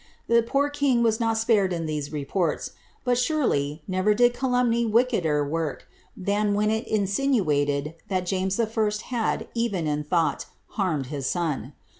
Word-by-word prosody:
The 235 Hz, 0 st, +5 dB
poor 275 Hz, +5 st, 0 dB
king 280 Hz, -5 st, +2 dB
was 225 Hz, -1 st, +2 dB
not 225 Hz, -1 st, +1 dB
spared 220 Hz, -4 st, +2 dB
in 165 Hz, -2 st, -2 dB
these 150 Hz, -2 st, -3 dB
reports, 155 Hz, +3 st, -1 dB, 0.3 s
but, 245 Hz, -1 st, +2 dB
surely, 165 Hz, -, 0 dB
never 185 Hz, +3 st, +2 dB
did 245 Hz, +2 st, +4 dB
calumny 245 Hz, -2 st, +1 dB
wickeder 210 Hz, -, +2 dB
work, 160 Hz, -1 st, -3 dB, 0.3 s
than 205 Hz, +2 st, 0 dB
when 210 Hz, +1 st, +2 dB
it 220 Hz, +1 st, -2 dB
insinuated 185 Hz, -, +1 dB
that 185 Hz, -2 st, -1 dB
James 190 Hz, +2 st, -1 dB
I. 230 Hz, -, +3 dB, 0.4 s
had, 235 Hz, -3 st, -2 dB
even 230 Hz, -8 st, -1 dB
in 150 Hz, 0 st, -1 dB
thought, 165 Hz, +2 st, 0 dB, 0.2 s
harmed 170 Hz, -9 st, -1 dB
his 140 Hz, -3 st, -2 dB
son. 165 Hz, -6 st, -2 dB
200 Hz, 150 wpm, -25 LUFS, 160-235 Hz, 0.4 s, The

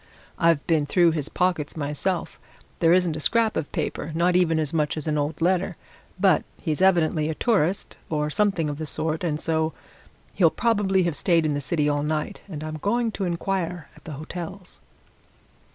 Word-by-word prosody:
"I've 165 Hz, -4 st, +3 dB
been 155 Hz, -3 st, +1 dB
through 170 Hz, +2 st, +4 dB
his 150 Hz, -3 st, -2 dB
pockets 175 Hz, -5 st, -1 dB
myself: 150 Hz, +5 st, -2 dB, 0.4 s
there 165 Hz, -1 st, +4 dB
isn't 175 Hz, -3 st, +3 dB
a -, -, -4 dB
scrap 225 Hz, +6 st, +2 dB
of 145 Hz, -, -3 dB
paper 160 Hz, -, -3 dB
not 175 Hz, +2 st, +2 dB
even 170 Hz, -3 st, +3 dB
as 155 Hz, 0 st, -1 dB
much 155 Hz, -1 st, 0 dB
as 155 Hz, -, -4 dB
an 155 Hz, -1 st, 0 dB
old 150 Hz, +1 st, -1 dB
letter. 185 Hz, +1 st, +1 dB, 0.4 s
But -, -, +4 dB, 0.2 s
he's 155 Hz, -1 st, -2 dB
evidently 165 Hz, -4 st, +3 dB
a 160 Hz, -, -2 dB
tourist, 195 Hz, -5 st, 0 dB
or 150 Hz, -1 st, -1 dB
something 195 Hz, -4 st, +1 dB
of 145 Hz, 0 st, -4 dB
the 155 Hz, -, -4 dB
sort, 155 Hz, +3 st, -2 dB
and 155 Hz, -3 st, -1 dB
so 160 Hz, 0 st, 0 dB, 0.6 s
he'll 170 Hz, -4 st, +4 dB
probably 200 Hz, -3 st, +1 dB
have 170 Hz, -3 st, 0 dB
stayed 165 Hz, -1 st, +2 dB
in 150 Hz, -, +1 dB
the 145 Hz, -, -2 dB
city 150 Hz, +1 st, 0 dB
all 145 Hz, 0 st, +1 dB
night, 155 Hz, +6 st, -2 dB
and 155 Hz, -4 st, -6 dB
I'm 155 Hz, 0 st, -5 dB
going 230 Hz, +7 st, 0 dB
to 200 Hz, -, -3 dB
inquire 175 Hz, -2 st, -2 dB
at -, -, -19 dB
the 155 Hz, -, -6 dB
hotels." 175 Hz, +5 st, -8 dB
165 Hz, 185 wpm, -24 LUFS, 150-185 Hz, 0.6 s, through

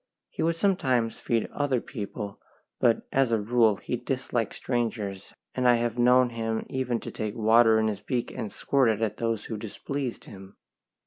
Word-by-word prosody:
He -, -, -5 dB
would 165 Hz, +1 st, +2 dB
sometimes 135 Hz, -, +1 dB
feed 115 Hz, -2 st, 0 dB
other 140 Hz, -4 st, +1 dB
people, 105 Hz, -4 st, -6 dB, 0.4 s
but 120 Hz, -3 st, +2 dB
as 135 Hz, -3 st, +2 dB
a 115 Hz, -, +3 dB
rule 110 Hz, 0 st, +3 dB
he 125 Hz, -, -4 dB
disliked 125 Hz, -2 st, -2 dB
strangers, 110 Hz, -6 st, -3 dB, 0.2 s
and 125 Hz, -1 st, +1 dB
I 120 Hz, -, +7 dB
have 120 Hz, 0 st, -1 dB
known 125 Hz, 0 st, +5 dB
him 115 Hz, -1 st, -2 dB
even 125 Hz, -3 st, -1 dB
take 110 Hz, 0 st, -5 dB
water 110 Hz, 0 st, +5 dB
in 110 Hz, 0 st, +2 dB
his 105 Hz, -2 st, -3 dB
beak 120 Hz, +3 st, -2 dB
and 105 Hz, -, -5 dB
squirt 135 Hz, -4 st, +2 dB
it 110 Hz, 0 st, 0 dB
at 110 Hz, -, -1 dB
those 115 Hz, -2 st, -1 dB
who 110 Hz, -, -4 dB
displeased 125 Hz, +4 st, -5 dB
him. 95 Hz, -1 st, -12 dB
115 Hz, 175 wpm, -27 LUFS, 110-125 Hz, 0.4 s, I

